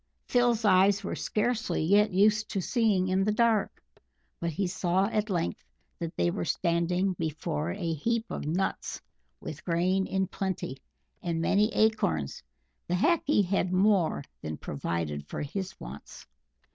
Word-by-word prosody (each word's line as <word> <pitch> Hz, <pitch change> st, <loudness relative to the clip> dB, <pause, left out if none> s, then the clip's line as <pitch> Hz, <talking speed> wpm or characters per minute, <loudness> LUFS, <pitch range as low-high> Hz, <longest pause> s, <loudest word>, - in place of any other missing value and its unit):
Phil's 240 Hz, -2 st, +2 dB
eyes 195 Hz, +1 st, +5 dB
were -, -, -3 dB
scarcely 220 Hz, -6 st, -1 dB
yet 205 Hz, +5 st, +4 dB
used 210 Hz, +3 st, +3 dB
to 195 Hz, -, -2 dB
"seeing 205 Hz, -2 st, +2 dB
in 190 Hz, +1 st, +2 dB
the 210 Hz, -, +2 dB
dark," 220 Hz, -1 st, +1 dB, 0.6 s
but 170 Hz, -, -1 dB
he 180 Hz, +5 st, -1 dB
saw 180 Hz, +1 st, +1 dB
at 215 Hz, 0 st, -1 dB
length 130 Hz, -, -2 dB, 0.4 s
that 165 Hz, -1 st, -5 dB
they 85 Hz, 0 st, +2 dB
were 90 Hz, -, -3 dB
standing 180 Hz, -, +1 dB
before 160 Hz, 0 st, -2 dB
a 175 Hz, -3 st, -2 dB
heap 225 Hz, +9 st, -1 dB
of -, -, -4 dB
nuts, 180 Hz, +5 st, -2 dB, 0.4 s
with -, -, -7 dB
grain 185 Hz, +3 st, +1 dB
in 190 Hz, 0 st, 0 dB
plenty, 185 Hz, -8 st, -4 dB, 0.4 s
and 170 Hz, -2 st, -2 dB
many 205 Hz, +6 st, +2 dB
acorns; 145 Hz, -, +1 dB, 0.5 s
the 175 Hz, -, 0 dB
Hackee 295 Hz, -, +3 dB
had 185 Hz, -1 st, 0 dB
more 185 Hz, -5 st, +3 dB, 0.2 s
than 80 Hz, -1 st, -5 dB
provided 75 Hz, -1 st, -3 dB
for -, -, -4 dB
his 190 Hz, +5 st, -5 dB
wants. 65 Hz, +4 st, -10 dB
185 Hz, 145 wpm, -29 LUFS, 165-210 Hz, 0.6 s, eyes